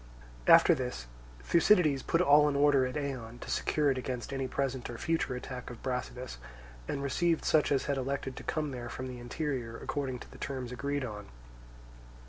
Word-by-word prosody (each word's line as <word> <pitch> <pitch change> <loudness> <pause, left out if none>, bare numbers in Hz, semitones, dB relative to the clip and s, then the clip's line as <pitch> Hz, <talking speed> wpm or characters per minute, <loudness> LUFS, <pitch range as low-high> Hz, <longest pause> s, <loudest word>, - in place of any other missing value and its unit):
After - - +8
this 60 -1 -4 0.4
Thucydides 165 - +4
put 165 - +1
all 150 -2 +6
in 140 - -2
order 140 -2 +4
at 125 - -6
Eion 130 -5 -4
to - - -6
secure 150 -2 +2
it 130 - -1
against 125 +1 -4
any 135 -1 -1
present 130 -1 -2
or 120 - -6
future 160 -4 -1
attack 125 0 -6
of 120 - -10
Brasidas, 125 - -4 0.5
and 140 - -3
received 165 +4 +1
such 155 -2 +3
as 140 - +2
had 140 -1 0
elected 135 0 -3
to - - -7
come 150 -2 -2
there 120 -2 -6
from 130 - -5
the 125 -1 -7
interior 120 -2 -3
according 135 -3 -3
to - - -12
the - - -13
terms 130 -3 -4
agreed 140 +2 -2
on. 105 -3 -7
135 Hz, 185 wpm, -31 LUFS, 125-145 Hz, 0.5 s, After